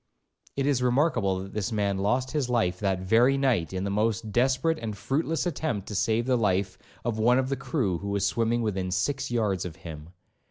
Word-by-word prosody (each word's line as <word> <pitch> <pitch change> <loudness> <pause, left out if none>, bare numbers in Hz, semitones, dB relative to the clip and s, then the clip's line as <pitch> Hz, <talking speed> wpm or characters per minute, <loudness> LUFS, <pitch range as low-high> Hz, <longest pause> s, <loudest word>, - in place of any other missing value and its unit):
It 135 - 0
is 140 -3 +2
remarkable 125 - +1
that 95 - -10
this 105 +1 -2
man 100 -3 0
lost 125 +6 0
his 145 -4 -1
life 90 -7 +1
that 95 -3 0
very 120 +8 +4
night 125 -12 +1
in 95 0 -3
the 100 - -2
most 110 +1 0
desperate 130 +7 +2
and 110 -3 -5
fruitless 155 - -1
attempt 150 - -2
to - - -5
save 110 +4 +1
the 130 0 +2
life 95 -2 0 0.3
of 115 -2 -1
one 120 +3 +4
of 130 0 0
the 135 - 0
crew 125 - -1
who 100 - -5
was 100 -1 0
swimming 115 +3 +1
within 95 -4 -1
six 135 +10 -1
yards 105 -6 0
of 85 -3 -6
him. 80 -1 -9
110 Hz, 205 wpm, -27 LUFS, 95-130 Hz, 0.3 s, very